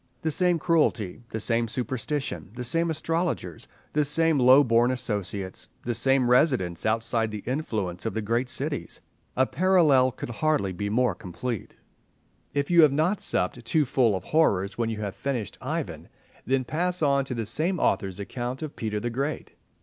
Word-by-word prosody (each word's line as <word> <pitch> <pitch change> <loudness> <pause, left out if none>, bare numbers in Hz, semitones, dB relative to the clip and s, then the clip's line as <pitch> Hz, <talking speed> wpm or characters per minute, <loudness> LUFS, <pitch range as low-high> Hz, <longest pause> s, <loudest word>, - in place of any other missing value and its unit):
The 160 - +1
same 175 +3 +2
cruelty, 150 - +1
the 110 - -4
same 115 +2 +1
superstition, 125 - -3
the 125 - -4
same 165 +7 0
astrologers, 165 - -2 0.3
the 150 - +3
same 160 +1 +2
low 130 +3 +7
born 120 -1 +3
associates, 100 -6 -3
the 120 - -1
same 130 +2 +2
residence 125 - +2
outside 115 0 0
the 105 -1 -6
influence 110 - -3
of 110 - -4
the 110 - -1
great 120 +4 0
cities—a 130 +1 -3
parallel 155 -8 +4
could 120 - -7
hardly 145 -8 0
be 100 +3 -3
more 125 +4 +2
complete. 105 +5 -6 0.8
If 140 +3 -1
you 170 -1 +7
have 155 -3 +6
not 160 +8 +1
supped 90 +7 -1
too 150 +6 +2
full 120 -5 +2
of 95 - -4
horrors 100 - +2
when 115 -1 -1
you 110 -1 -4
have 100 -2 -4
finished 125 -7 -3
Ivan, - - -4 0.4
then 130 +1 +2
pass 175 +5 -1
on 140 -1 +3
to 130 - -4
the 115 -1 -2
same 165 - 0
author's 95 -8 0
account 120 +6 -4
of 155 - -6
Peter 105 -2 -2
the 120 +3 -3
Great. 140 +5 -3
125 Hz, 170 wpm, -26 LUFS, 110-150 Hz, 0.8 s, low